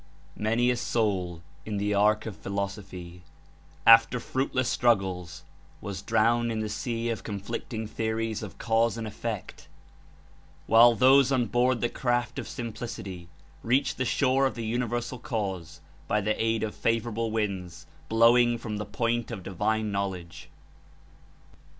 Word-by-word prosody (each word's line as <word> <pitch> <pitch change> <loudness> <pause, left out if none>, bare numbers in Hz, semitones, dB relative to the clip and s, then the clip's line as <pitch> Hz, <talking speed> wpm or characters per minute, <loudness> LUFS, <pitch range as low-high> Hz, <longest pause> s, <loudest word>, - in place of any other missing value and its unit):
''Many 115 +3 +2
a 125 - -1
soul 95 -8 -1 0.2
in 105 -2 -4
the 105 +1 0
ark 105 +1 +3
of 110 -4 -5
philosophy, 95 -3 -5 0.6
after 115 +2 +7
fruitless 130 0 -1
struggles, 95 -7 0 0.4
was 100 -2 -6
drowned 115 +2 +2
in 110 - -2
the 110 -1 -2
sea 115 +1 -2
of 115 - -4
con 100 -2 -4
flicting 110 +2 -5
theories 110 0 -2
of 105 -3 -8
cause 115 0 +1
and 115 - -4
effect, 110 -1 -6 1.0
while 115 +1 +7
those 135 +2 +5
on 130 -3 +2
board 120 +3 +1
the 120 - +2
craft 120 +1 -1
of 120 - -6
simplicity 110 -7 -6 0.3
reached 130 +4 +1
the - - +2
shore 135 +1 +2
of - - -5
the 115 -2 -4
Universal 120 +1 -2
Cause 95 - -4 0.3
by 105 - +2
the 105 +1 0
aid 115 -1 +1
of 110 - -2
favorable 115 0 -1
winds 100 -6 -3 0.2
blowing 120 +1 +5
from 110 -2 -5
the 105 - -4
Point 115 +3 -1
of 95 - -6
Divine 105 +3 -1
Knowledge. 90 -4 -4
110 Hz, 145 wpm, -27 LUFS, 100-120 Hz, 1.0 s, after